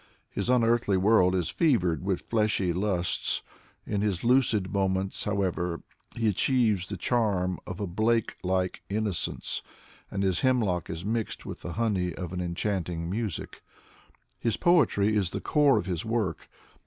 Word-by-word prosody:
His - - -2
unearthly 115 -5 +3
world 95 -2 +4
is 90 -3 0
fevered 95 - +2
with 95 -2 -1
fleshly 105 -5 +1
lusts. 90 -2 0 0.4
In 105 -1 -1
his 100 -4 -1
lucid 115 -6 +3
moments, 95 -1 0
how 100 -1 0
ever, 90 -2 -2 0.3
he 115 -1 0
achieves 105 -3 +2
the 100 - -4
charm 95 -4 0
of 90 - -6
a 105 - -1
Blake 110 +5 0
like 95 0 -1
innocence, 105 -4 -2 0.5
and 100 0 -2
his 95 -2 +2
hemlock 110 -10 +1
is 80 +3 -5
mixed 110 +1 -2
with - - -7
the 85 - -5
honey 95 -6 0
of 90 -1 -6
an 90 - -2
enchanting 85 -1 -2
music. 105 -4 -4 0.8
His 115 -3 0
poetry 110 - +3
is 100 -4 +1
the - - -4
core 145 -2 +3
of - - -1
his 90 -3 -2
work. 115 -3 -2
100 Hz, 155 wpm, -28 LUFS, 90-115 Hz, 0.8 s, world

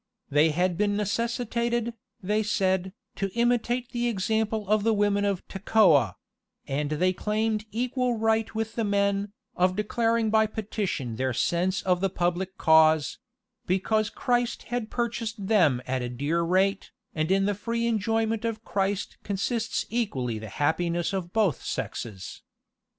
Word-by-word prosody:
They 150 +3 +5
had 180 +3 0
been 205 -1 +2
necessitated, 235 +2 -1 0.3
they 210 +3 +1
said, 190 -3 0 0.3
to 195 -1 -1
imitate 240 +1 +1
the 240 0 -1
example 220 0 -1
of 215 +1 +3
the 225 0 +3
women 205 0 +2
of 200 -3 -2
Tekoah: 185 - +3 0.5
and 145 +2 -2
they 180 +5 +1
claimed 215 +2 -1
equal 250 +1 0
right 225 0 +1
with 220 0 -2
the 230 - -1
men, 200 0 +1 0.2
of 185 +1 +2
declaring 225 +1 +1
by 220 0 +4
petition 195 - -3
their 130 0 0
sense 180 +8 0
of 180 -1 +1
the 195 - +2
public 180 +1 -2
cause; 160 -2 +4 0.5
because 215 +4 +1
Christ 245 +1 -1
had 240 -2 -3
purchased 230 -3 -3
them 170 - +3
at 130 0 -1
as 120 0 -4
dear 150 +5 0
a - - +1
rate, 190 +3 +1 0.2
and 155 0 -1
in 195 +1 +3
the 205 - +1
free 230 +3 -2
enjoyment 225 0 0
of 225 -1 -3
Christ 195 0 -2
consists 215 +3 -2
equally 130 - -1
the 110 0 -8
happiness 170 +4 0
of 180 -3 -3
both 205 - +1
sexes. 95 -5 -5
205 Hz, 150 wpm, -27 LUFS, 175-225 Hz, 0.5 s, They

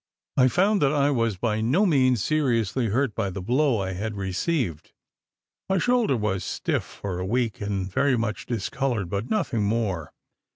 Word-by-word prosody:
I 130 -1 +5
found 195 - +2
that 140 -2 +4
I 145 -1 +2
was 115 -6 0
by 110 +2 -1
no 140 - +3
means 130 - +3
seriously 125 -6 +1
hurt 120 +2 0
by 100 - -1
the 95 +1 -6
blow 125 +5 +1
I 95 -1 -2
had 105 +3 -4
received: 95 - -2 0.8
my 190 - +2
shoulder 235 - +2
was 100 -4 -1
stiff - - -1
for 95 -3 -6
a 90 - -2
week, 115 0 -1
and 100 -2 -2
very 130 +7 +1
much 115 -1 -3
discoloured, 115 -3 -2
but 100 +4 -3
nothing 140 - 0
more. 100 -7 -1
115 Hz, 170 wpm, -25 LUFS, 100-140 Hz, 0.8 s, I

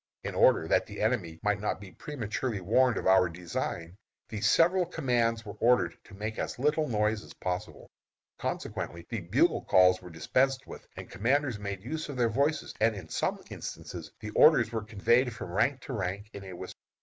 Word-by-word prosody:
In - - -4
order - - +4
that - - +2
the - - -8
enemy 100 -8 -1
might 105 -1 +1
not 105 - -1
be 95 -2 -11
prematurely 120 -4 -4
warned 115 +5 +3
of - - -3
our 95 -1 +5
design, 85 +1 -5 0.3
the 105 -2 -5
several 175 - +4
commands 120 -9 0
were 105 - -7
ordered 115 -8 +3
to - - -13
make 110 +2 -4
as - - -3
little 150 +4 +1
noise 105 -1 0
as - - -13
possible. 90 0 -4 0.5
Consequently 85 0 -4
the 115 -4 -3
bugle 85 - +2
calls 90 0 +5
were 90 - -10
dispensed 130 - +1
with, - - -11
and - - -7
commanders 130 +2 +1
made 100 -2 -5
use 155 +5 -4
of 140 - -5
their 120 -2 +3
voices, 140 +7 0
and 110 0 +3
in 90 -5 -9
some - - -1
instances 80 -2 -7
the 105 -1 -6
orders 125 -4 +6
were 115 -1 -2
conveyed 115 +4 +2
from 90 - -7
rank 120 +8 +1
to 135 - -7
rank 100 0 -3
in 100 -1 -8
a 95 - -8
whisper. 85 - -9
110 Hz, 190 wpm, -29 LUFS, 95-125 Hz, 0.5 s, orders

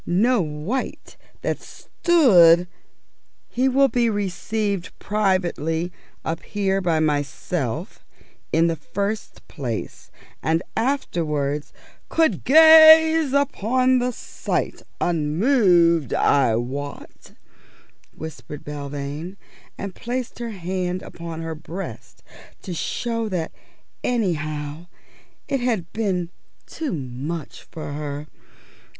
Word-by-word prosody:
No 220 +6 +2
wight 155 - -4 0.3
that - - -1
stood 200 - +5
_" 180 - -7 0.8
"He 255 +2 +1
will 275 +1 +4
be 240 -1 +1
received 205 -1 -2
privately 180 -5 0 0.3
up 165 +1 -2
here 195 -2 -1
by 170 -3 +1
myself 145 -3 -2 0.5
in 165 +1 +4
the 165 -1 +1
first 200 +7 -4
place, 120 -7 -5 0.3
and 165 +2 +1
afterwards 155 - -1 0.2
" - - -31
"Could 320 - +2
gaze 315 0 +8
upon 255 -2 +2
the 250 +1 0
sight - - -3 0.2
unmoved, 170 - +3
I 130 -5 +3
wot," 135 +5 -6 0.8
whispered 150 -1 -8
Belvane, 145 +4 -6 0.4
and 200 -2 -5
placed 245 +3 -4
her 235 -1 -4
hand 185 -2 -3
upon 165 -1 -7
her 165 0 -4
breast 165 +5 -8 0.4
to 185 - -5
show 230 +6 -2
that 175 -4 -2 0.5
anyhow 155 -7 -2 0.6
it 275 - 0
had 225 -9 -1
been 185 -6 -1 0.3
too 315 -3 -4
much 145 +2 -5
for 155 -3 -7
her. 145 0 -5
180 Hz, 100 wpm, -23 LUFS, 155-230 Hz, 0.8 s, gaze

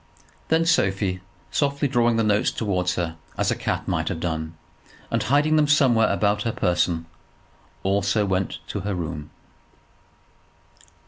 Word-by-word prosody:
Then 160 +1 +2
Sophie, 95 - +1 0.3
softly 140 0 +1
drawing 120 -3 +2
the 115 - +2
notes 105 0 +2
towards 90 -4 -1
her 85 -2 -3 0.2
as - - +1
a - - +1
cat - - -3
might - - -1
have 80 - -2
done, 80 -1 -3 0.6
and - - +1
hiding 150 +4 +3
them 150 -1 +4
somewhere 130 -7 +4
about 105 0 +1
her 115 - -1
person, 85 -4 0 0.8
also 100 +2 +1
went 95 -1 -1
to - - -3
her 100 +1 -3
room. 80 -4 -5
100 Hz, 140 wpm, -24 LUFS, 90-125 Hz, 0.8 s, them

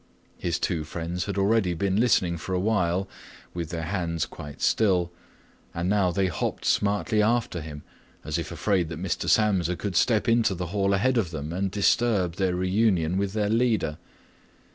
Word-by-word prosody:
His 85 -2 -1
two 80 -4 -1
friends 85 +3 -4
had 100 -1 -4
already 100 -2 +2
been 95 +3 0
listening 95 -8 +2
for 95 +3 -4
a - - +1
while 95 -2 +1 0.5
with 85 -3 -4
their 85 -2 -4
hands 85 -2 -2
quite 75 -3 -10
still, 90 -5 +2 0.6
and 85 +1 -1
now 100 -2 +2
they 95 +2 0
hopped 90 - -3
smartly 105 +1 +1
after 115 -5 0
him, 75 -1 -8 0.4
as 75 +2 -2
if 80 -2 -5
afraid 95 -6 0
that 80 -1 -6
Mr. 90 -2 -2
Samsa 95 -5 +2
could 100 0 -4
step 110 +4 +2
into 115 -4 +3
the 90 0 -4
hall 100 -1 +2
ahead 125 +5 +2
of 95 -7 -1
them 80 -1 -5
and 95 +2 -1
disturb 100 -3 +1
their 95 -2 +1
reunion 95 -2 +1
with 100 -1 -2
their 105 -1 0
leader. 110 -10 +1
95 Hz, 175 wpm, -26 LUFS, 85-105 Hz, 0.6 s, into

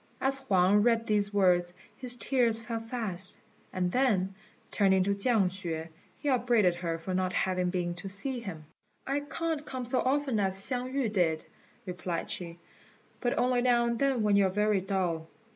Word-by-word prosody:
As 270 0 +1
Huang 200 -5 +3
read 230 0 +2
these 205 -2 +2
words 180 -3 +3 0.2
his 245 -1 0
tears 240 -4 +2
fell 230 0 -4
fast; 220 -6 -2 0.3
and 180 -1 -1
then, 200 -6 +2 0.4
turning 190 -2 +3
to 200 +1 +1
Chiang 200 -1 +2
hsüeh, 170 -3 -5 0.3
he 295 - -6
upbraided 240 -8 +3
her 170 -1 -3
for 165 +3 -5
not 185 0 0
having 185 -1 0
been 175 -1 -1
to 180 +3 -7
see 245 +7 -2
him. 175 -9 -7 0.4
"I 275 +2 0
can't 315 +1 -3
come 255 -4 -5
so 250 +2 +1
often 270 -3 +1
as 190 -1 0
Hsiang 250 +5 -1
yü 245 -6 0
did," 165 -5 +1 0.4
replied 180 -2 -4
she, 170 -1 -5 0.6
"but 245 0 -1
only 250 0 +2
now 240 -1 +3
and 235 -1 -1
then 270 -5 +2
when 205 -1 +3
you 200 -1 +5
are - - -1
very 210 0 +1
dull." 180 -4 -1
205 Hz, 175 wpm, -29 LUFS, 185-245 Hz, 0.6 s, you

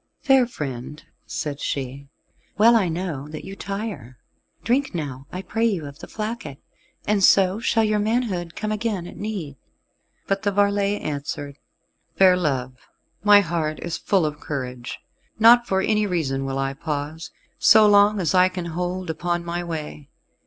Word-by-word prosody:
"Fair 270 -4 +5
friend," 150 - -6 0.2
said 145 -2 -4
she, 140 0 -4 0.5
"well 230 +3 +6
I 195 -6 +3
know 160 -5 -4
that 155 0 -8
you 195 - -8
tire: 195 - -6 0.5
drink 260 -1 0
now, 140 -4 -5
I 185 +1 -5
pray 225 +5 0
you, 185 -9 -2
of 140 +2 -10
the - - -9
flacket, 215 - -5 0.5
and 205 -1 +1
so 190 +1 +5
shall 225 -1 +2
your 215 -1 +1
manhood 205 -6 -1
come 215 0 -3
again 210 -4 -2
at - - -10
need." 190 -10 -5 0.7
But 195 0 -1
the 205 -2 0
varlet 200 0 +1
answered, 145 -1 -5 0.6
"Fair 185 -1 +6
love, 130 -7 -3 0.4
my 205 -1 +7
heart 165 -4 -2
is 170 -1 -4
full 190 -5 +2
of 150 -1 -4
courage; 125 -4 -5 0.4
nor 230 +2 +8
for 190 -3 +1
any 210 +1 +1
reason 135 -7 -1
will 135 0 -3
I 135 0 -1
pause, 150 +2 -5 0.3
so 220 -1 +7
long 205 0 +5
as 170 -5 0
I 185 0 +5
can 185 -2 -5
hold 180 +2 -3
upon 175 +1 -2
my 175 +1 -3
way. 155 -3 -6
180 Hz, 160 wpm, -23 LUFS, 150-205 Hz, 0.7 s, nor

